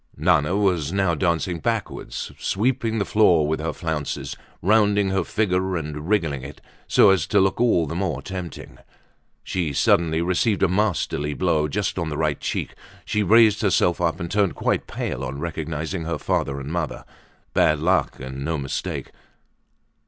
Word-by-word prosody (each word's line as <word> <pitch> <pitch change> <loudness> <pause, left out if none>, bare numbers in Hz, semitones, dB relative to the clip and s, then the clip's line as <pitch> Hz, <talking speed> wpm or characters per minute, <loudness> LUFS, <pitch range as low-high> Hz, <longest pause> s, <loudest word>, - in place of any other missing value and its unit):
Nana 80 +3 +2
was 90 -7 +1
now 95 -2 +1
dancing 85 +1 0
backwards, - - -3
sweeping 115 +1 0
the 100 - 0
floor 85 -8 +4
with 80 +1 -1
her 80 +1 -2
flounces, 80 -4 -4 0.3
rounding 105 0 +3
her 95 -1 +1
figure 95 -2 0
and 75 +1 -5
wriggling 80 -10 +1
it, 70 +3 -9 0.3
so - - +6
as 95 - +1
to 105 - +3
look 95 +4 +2
all 110 -9 +3
the 75 - -5
more 90 +1 -2
tempting. 90 -5 -7 0.6
She 85 -6 -2
suddenly 80 +3 +2
received 95 +4 +1
a - - +5
masterly 90 -6 0
blow 80 -4 +1
just 95 +4 -2
on 85 -2 -2
the 75 - -4
right 75 -2 0
cheek. - - -3 0.3
She 105 - 0
raised 110 +1 +5
herself 90 -4 +2
up 85 -1 0
and 85 +1 -5
turned 100 -3 +1
quite - - -1
pale 65 - -4
on 70 +1 -4
recognizing 80 +1 -4
her 85 -1 -2
father 70 -1 -1
and 70 +2 -6
mother. 85 -3 -3 0.5
Bad 75 - +3
luck 90 +5 +1
and 65 +1 -6
no 80 +2 -1
mistake. 70 -2 -4
85 Hz, 165 wpm, -23 LUFS, 75-95 Hz, 0.6 s, so